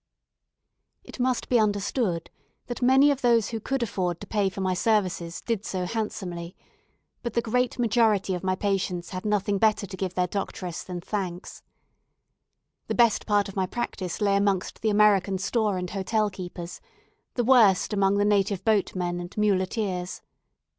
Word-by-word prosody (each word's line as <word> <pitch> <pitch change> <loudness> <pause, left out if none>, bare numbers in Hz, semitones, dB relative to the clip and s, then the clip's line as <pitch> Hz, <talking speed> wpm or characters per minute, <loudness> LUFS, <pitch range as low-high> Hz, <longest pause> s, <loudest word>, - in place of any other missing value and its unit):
It - - -12
must 250 0 0
be 245 - +3
understood 205 - 0 0.3
that 245 - -6
many 265 +3 +6
of 275 -1 -2
those 235 -4 +3
who 225 - -3
could 265 +3 -1
afford 180 -6 -2
to - - -6
pay 205 -3 0
for 190 - -9
my 185 -1 0
services 180 -4 0
did 225 -4 -2
so 185 -4 -3
handsomely, 180 -5 -4 0.7
but 235 -3 -4
the 235 - +3
great 250 +3 0
majority 220 -5 +2
of 180 - -4
my 185 0 +1
patients 190 -3 -2
had 185 +1 -5
nothing 205 -1 +1
better 215 -1 +2
to 200 - -8
give 185 -1 -4
their 180 - +2
doctress 180 -2 -4
than 180 -1 -6
thanks. 185 -2 -5 1.3
The - - -2
best 235 -3 +3
part 205 -1 +2
of 195 - -9
my 190 -2 0
practice 190 -5 -4
lay 200 -1 +3
amongst 200 -2 0
the 220 - +1
American 205 -2 +4
store 205 +1 0
and 180 0 -3
hotel 210 +2 0
keepers, 175 -2 -7 0.5
the 245 - +1
worst 225 -6 +5
among 195 0 +2
the 205 - +2
native 200 -2 +1
boatmen 185 -5 0
and 175 +3 -8
muleteers. 190 -2 -1
200 Hz, 165 wpm, -26 LUFS, 185-220 Hz, 1.3 s, many